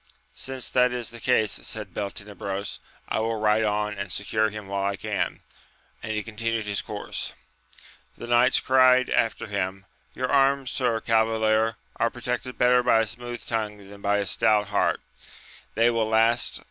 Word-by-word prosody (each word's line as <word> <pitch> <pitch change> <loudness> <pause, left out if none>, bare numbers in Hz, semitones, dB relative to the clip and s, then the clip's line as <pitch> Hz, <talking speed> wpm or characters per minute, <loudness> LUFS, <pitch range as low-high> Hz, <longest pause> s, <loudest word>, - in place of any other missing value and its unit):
Since 130 -2 -4
that 125 0 +4
is 120 -2 -4
the 120 - -10
case, 110 -3 +2
said 105 -5 -6
Beltenebros, 100 -1 -4 0.3
I - - -1
will 115 +1 0
ride 110 0 +2
on 105 0 0
and 100 -2 -4
secure 110 +1 0
him 105 -1 -8
while 100 0 -2
I 100 0 0
can; 105 0 -3 0.6
and 110 - -4
he 105 -1 -2
continued 115 0 -2
his 100 -1 -1
course. - - -5 0.8
The - - -7
knights 120 +2 +4
cried 130 -1 +4
after 115 -1 +1
him, 95 -2 -3 0.3
Your 130 - -1
arms, 135 -1 +3
sir 120 -4 0
cavalier, 110 0 +2 0.2
are 115 - +2
protected 125 0 -4
better 125 0 +5
by 120 -2 +4
a - - 0
smooth 120 +2 -7
tongue 110 -2 -2
than 100 0 -12
by 100 0 +2
a 100 - -1
stout 105 +2 +2
heart: 105 - +1 0.7
they 115 +2 +4
will 115 -2 0
last 115 +2 +3
to. - - -5
110 Hz, 170 wpm, -25 LUFS, 105-120 Hz, 0.8 s, better